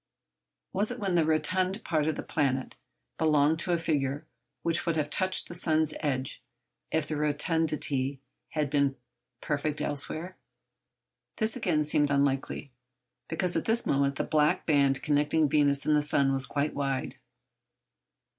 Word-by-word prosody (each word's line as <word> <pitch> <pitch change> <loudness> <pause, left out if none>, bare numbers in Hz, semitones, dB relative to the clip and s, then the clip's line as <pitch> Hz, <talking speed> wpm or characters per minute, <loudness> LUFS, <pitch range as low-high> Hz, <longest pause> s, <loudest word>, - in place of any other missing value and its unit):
Was 205 +3 +1
it 245 - -4
when 195 -5 -2
the 165 -3 +3
rotund 185 +6 +1
part 155 -3 0
of 160 - 0
the - - -5
planet 135 -4 -1 0.4
belonged 155 0 +3
to 175 - +2
a 170 - +3
figure 145 -4 -1 0.4
which 165 0 +2
would 165 - +1
have 150 -2 -1
touched 185 +2 +3
the - - -8
sun's 160 -2 +1
edge 135 -3 -2 0.5
if 160 -2 0
the 155 - -3
rotundity 150 -3 0 0.3
had 150 -3 -2
been 140 -2 +2 0.5
perfect 150 0 -2
elsewhere? 155 +5 -3 1.0
This, 220 +1 0
again, 175 -11 +1
seemed 145 -1 +2
unlikely, 140 0 0 0.6
because 175 +2 -1
at - - -1
this 225 +1 +1
moment 140 0 +1
the - - -1
black 150 -1 +1
band 140 -3 +2
connecting 150 +1 +2
Venus 145 -1 +2
and 155 - +3
the 150 - +3
sun 140 -2 +2
was 135 0 0
quite 145 +1 -1
wide. 135 -2 -2
150 Hz, 150 wpm, -28 LUFS, 140-165 Hz, 1.0 s, the